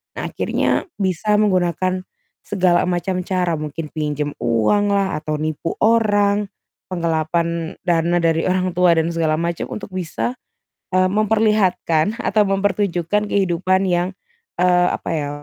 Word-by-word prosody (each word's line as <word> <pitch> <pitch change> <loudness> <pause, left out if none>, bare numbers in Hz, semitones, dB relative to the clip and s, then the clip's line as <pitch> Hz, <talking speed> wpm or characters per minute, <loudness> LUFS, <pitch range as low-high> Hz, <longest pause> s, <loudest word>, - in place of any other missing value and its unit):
Nah - - -4
akhirnya, - - 0
bisa 195 +2 0
menggunakan 185 -2 +1 0.4
segala 180 -3 +1
macam 180 +1 -1
cara 180 -4 0
mungkin 155 +1 -5
pinjam 150 -1 -2
uanglah, 195 - +1
atau 155 0 -3
nipu 155 +1 -3
orang, 205 -2 +3 0.4
penggelapan 170 -1 -1
dana 170 0 +2
dari 165 0 +2
orang 185 0 +1
tua 175 -1 +4
dan 165 +1 +1
segala 160 -2 +1
macam 170 +1 -2
untuk 205 - -7
bisa, 185 +5 -3 0.6
mmm, 185 0 +3
memperlihatkan 210 -3 +1
atau 210 0 +2
mempertunjukkan 195 -1 0
kehidupan 185 0 +1
yang, 175 +1 0 0.5
eee, 180 0 +4
apa - - -4
ya 145 -2 -2
180 Hz, 125 wpm, -20 LUFS, 165-200 Hz, 0.6 s, tua